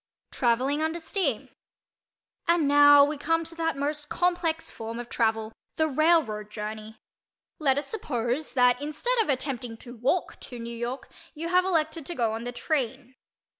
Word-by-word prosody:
TRAVELLING 260 +5 +1
UNDER 320 +2 -1
STEAM 325 - -1 1.0
And 335 -3 +3
now 290 0 +8
we 295 0 -3
come 330 +2 +1
to 330 +1 -9
that 325 -3 -1
most 295 +1 -3
complex 350 -2 0
form 225 +1 -6
of 240 0 -7
travel—the 225 +7 -1
railroad 290 -9 +2
journey. 215 +1 -7 0.6
Let 275 -3 +3
us 285 - -1
suppose 260 - -3
that 250 0 +4
instead 385 +12 -1
of 430 - -2
attempting 255 -4 -2
to 240 +1 -11
walk 270 +10 -1
to 245 - -9
New 235 0 -6
York 240 +3 -4 0.3
you 330 +2 -4
have 365 +1 +4
elected 320 -4 0
to 345 - -4
go 230 -3 0
on 225 +2 -5
the 245 - -3
"train." 260 -1 -2
280 Hz, 160 wpm, -27 LUFS, 240-320 Hz, 1.0 s, now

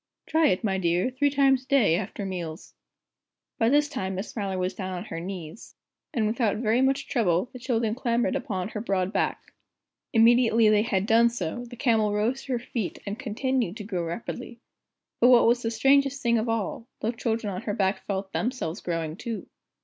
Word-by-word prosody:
Try 320 0 +3
it, 185 0 +1
my 190 -3 0
dear, 175 +6 +1
three 285 +3 +2
times 270 -2 +3
a - - -27
day, 255 -13 +4
after 200 +2 -4
meals." 170 -4 -6 0.9
By 225 - +4
this 295 +2 +4
time 190 -8 -4
Miss 190 +4 -4
Smiler 195 -4 -3
was 185 +1 -1
down 185 0 -5
on 175 - -6
her 165 - -5
knees, 180 +1 -8 0.4
and 225 -3 0
without 220 -1 +1
very 225 +2 +2
much 270 +1 +1
trouble 200 -2 +1
the 250 - -8
children 230 -3 0
clambered 240 +1 0
upon 205 -8 -3
her 210 - -5
broad 195 -2 -1
back. - - -2 0.6
Immediately 230 -1 +5
they 210 -1 +4
had 200 -3 0
done 230 +2 +5
so, 235 +1 -4
the 245 - -9
Camel 225 -5 +2
rose 230 +6 0
to 270 - -2
her - - +1
feet, 235 -4 -4
and 205 +3 -4
continued 245 -3 -1
to 210 - -6
grow 190 -4 -3
rapidly. 230 +7 -6 0.6
But 245 - +6
what 245 -2 +7
was 240 +1 +3
the 225 - -1
strangest 275 +4 +2
thing 235 -1 +3
of 225 +2 -2
all, 225 +1 -2
the 220 - 0
children 225 -3 -2
on 185 - -4
her 205 - -3
back 190 0 0
felt 195 -1 -3
themselves 225 -7 -2
growing, 165 -2 -3
too! 230 -2 -5
225 Hz, 195 wpm, -26 LUFS, 190-245 Hz, 0.9 s, what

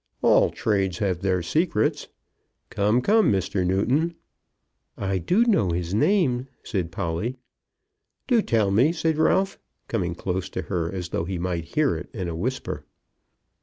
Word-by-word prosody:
"All - - +5
trades 95 -4 0
have 95 -4 0
their 95 -2 0
secrets. 155 - 0 0.6
Come, 105 +5 +2
come, 220 - +4
Mr. 95 -1 0
Newton!" 125 - +1 0.8
"I 95 -3 -2
know 210 - +3
his 85 +1 -2
name," 130 - +2 0.2
said 90 -6 -3
Polly. 90 +7 -2 0.9
"Do 240 -4 +3
tell 110 - +1
me," 125 +11 +4
said 160 -2 0
Ralph, 190 +4 +2 0.3
coming 90 -7 -1
close 95 +1 -3
to - - -4
her, 85 -4 -2
as 90 -2 -5
though 85 - -2
he 95 0 -3
might 85 -2 -4
hear 150 -2 +3
it - - -7
in 95 -5 -3
a 85 - -4
whisper. 125 +10 -3
100 Hz, 145 wpm, -24 LUFS, 90-140 Hz, 0.9 s, All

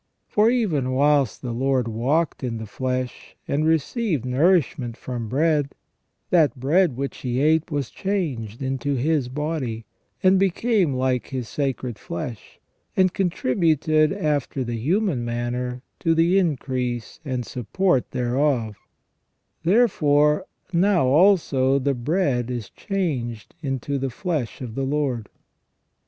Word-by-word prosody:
For 210 +2 +3
even 165 - +1
whilst 140 -3 +2
the 125 - -3
Lord 130 0 +1
walked 135 +9 0
in 120 -2 -2
the 110 - -6
flesh, 130 +3 -4
and 150 +3 +1
received 160 - 0
nourishment 135 -3 +2
from 120 -4 -5
bread, 145 +1 +1 0.6
that 155 -6 +3
bread 150 +1 +2
which 140 0 -3
He 125 -1 -2
ate 155 +3 +3
was 145 -5 -2
changed 140 - -3
into 135 +1 -1
His 140 0 +1
body, 135 -6 -3 0.4
and 190 0 +5
became 195 - +2
like 130 -1 0
His 130 -3 -4
sacred 130 -5 -3
flesh, 110 +6 -7 0.4
and 185 -1 +4
contributed 155 -3 +2
after 150 -8 -1
the 120 -1 -3
human 170 - +1
manner 120 +1 -3 0.2
to 165 0 +2
the 170 +4 +4
increase 130 - -2
and 130 -4 -3
support 130 - 0
thereof 125 -3 0 0.9
Therefore, 150 -7 +3 0.3
now 180 -2 +3
also 140 -4 +4
the 140 +1 +1
bread 130 -2 0
is 120 -6 -5
changed 135 - -3
into 140 -1 -2
the 135 0 -1
flesh 150 - -3
of 120 -4 -6
the 135 - -3
Lord." 135 -5 -1
140 Hz, 125 wpm, -23 LUFS, 125-165 Hz, 0.9 s, and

